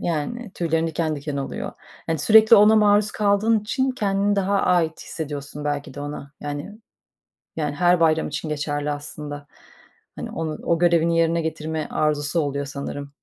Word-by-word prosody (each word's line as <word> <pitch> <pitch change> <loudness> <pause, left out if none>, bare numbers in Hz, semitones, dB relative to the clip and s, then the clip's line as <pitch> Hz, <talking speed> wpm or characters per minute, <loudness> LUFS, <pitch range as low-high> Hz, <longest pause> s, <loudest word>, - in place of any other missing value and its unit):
yani, 195 +8 -3
tüylerin 165 -1 0
diken 160 -1 -1
diken 145 0 -5
oluyor. 135 -1 -4 0.3
Hani, 165 -1 -1
sürekli 220 +7 +7
ona 210 +2 +6
maruz 210 0 +4
kaldığın 210 +2 +2
için 260 +6 -1
kendini 205 -4 0
daha 200 0 +1
ait 170 -3 +1
hissediyorsun 145 -1 -6
belki 145 -1 -3
de 145 - -7
ona. 145 -1 -7
Yani 145 +9 -6 0.8
yani, 150 -2 -2
her 175 +1 +3
bayram 160 -1 +3
için 155 +2 -4
geçerli 145 -1 -2
aslında. 145 0 -6 0.7
Hani, - - -6
onu 160 -1 -4
o 170 -1 +1
görevini 170 -1 +3
yerine 165 0 +2
getirme 160 -1 -3
arzusu 150 +1 0
oluyor 140 -1 -2
sanırım. 140 0 -6
160 Hz, 155 wpm, -23 LUFS, 145-195 Hz, 0.8 s, sürekli